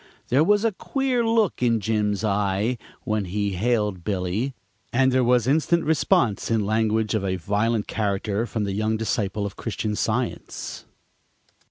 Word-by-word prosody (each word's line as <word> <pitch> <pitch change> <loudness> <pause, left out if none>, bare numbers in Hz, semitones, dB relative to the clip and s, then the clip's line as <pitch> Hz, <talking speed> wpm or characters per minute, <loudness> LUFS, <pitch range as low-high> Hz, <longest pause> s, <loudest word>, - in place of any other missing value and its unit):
There 135 +5 +4
was 205 +5 +3
a 225 - +3
queer 255 +4 -1
look 225 - +1
in 115 -2 +3
Jim's 105 -1 0
eye 105 +3 0 0.2
when 110 -2 -1
he 100 +2 -1
hailed 105 -2 0
Billy, 100 +7 -2 0.4
and 130 +1 +3
there 130 0 +3
was 120 -1 +3
instant 160 +5 +2
response 120 -8 +2
in 110 -3 +1
language 110 0 +1
of 110 -3 0
a 95 -1 0
violent 105 +5 0
character 105 +1 -1
from 110 -2 -2
the 100 -1 -2
young 110 +2 0
disciple 105 -2 -1
of 100 - -6
Christian 105 -2 -3
Science. 115 +3 -3
110 Hz, 155 wpm, -24 LUFS, 100-125 Hz, 0.4 s, There